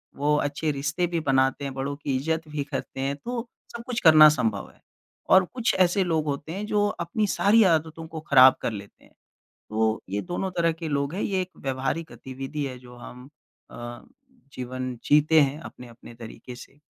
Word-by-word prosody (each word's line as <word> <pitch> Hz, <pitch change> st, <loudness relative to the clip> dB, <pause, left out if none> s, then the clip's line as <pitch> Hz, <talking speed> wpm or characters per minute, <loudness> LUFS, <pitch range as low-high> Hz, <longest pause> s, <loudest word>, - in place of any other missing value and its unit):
वो 150 Hz, +1 st, +1 dB
अच्छे 145 Hz, +2 st, -1 dB
रिश्ते 145 Hz, +5 st, -1 dB
भी 170 Hz, -, +1 dB
बनाते 135 Hz, +1 st, +2 dB
हैं 135 Hz, -, -4 dB
बड़ों 135 Hz, +1 st, -3 dB
की 140 Hz, -2 st, -3 dB
इज़्ज़त 160 Hz, +4 st, -2 dB
भी 150 Hz, -1 st, -3 dB
करते 140 Hz, -1 st, -6 dB
हैं 135 Hz, +1 st, -1 dB
तो 240 Hz, -1 st, -4 dB, 0.3 s
सब 235 Hz, -, -7 dB
कुछ 240 Hz, -1 st, -2 dB
करना 155 Hz, -2 st, +9 dB
संभव 115 Hz, -9 st, -1 dB
है, -, -, -27 dB, 0.5 s
और 190 Hz, -1 st, +6 dB
कुछ 245 Hz, -2 st, 0 dB
ऐसे 185 Hz, +1 st, +3 dB
लोग 160 Hz, -3 st, 0 dB
होते 145 Hz, +1 st, -4 dB
हैं 200 Hz, +4 st, -4 dB
जो 205 Hz, -1 st, +1 dB
अपनी 205 Hz, +4 st, -2 dB
सारी 215 Hz, +3 st, +4 dB
आदतों 160 Hz, +1 st, -3 dB
को 160 Hz, 0 st, -7 dB
ख़राब 130 Hz, -2 st, +8 dB
कर -, -, -1 dB
लेते 100 Hz, -1 st, -10 dB
हैं, -, -, -22 dB, 0.6 s
तो 110 Hz, 0 st, 0 dB
ये 100 Hz, +1 st, -2 dB
दोनों 185 Hz, +1 st, -4 dB
तरह 165 Hz, -1 st, +3 dB
के 160 Hz, 0 st, -6 dB
लोग 140 Hz, 0 st, -1 dB
हैं 200 Hz, -, -3 dB
ये 190 Hz, -2 st, 0 dB
एक 185 Hz, 0 st, -6 dB
व्यवहारिक 135 Hz, +5 st, -3 dB
गतिविधि 135 Hz, +3 st, -6 dB
है 130 Hz, -2 st, -6 dB
जो 125 Hz, -1 st, -14 dB
हम 125 Hz, +1 st, -11 dB, 0.5 s
अ, 120 Hz, 0 st, -8 dB, 0.5 s
जीवन 130 Hz, 0 st, -5 dB
जीते 150 Hz, +2 st, +5 dB
हैं 140 Hz, +2 st, 0 dB
अपने-अपने 120 Hz, -5 st, -12 dB
तरीक़े 115 Hz, +1 st, -10 dB
से। 135 Hz, +3 st, -14 dB
145 Hz, 190 wpm, -25 LUFS, 130-165 Hz, 0.6 s, करना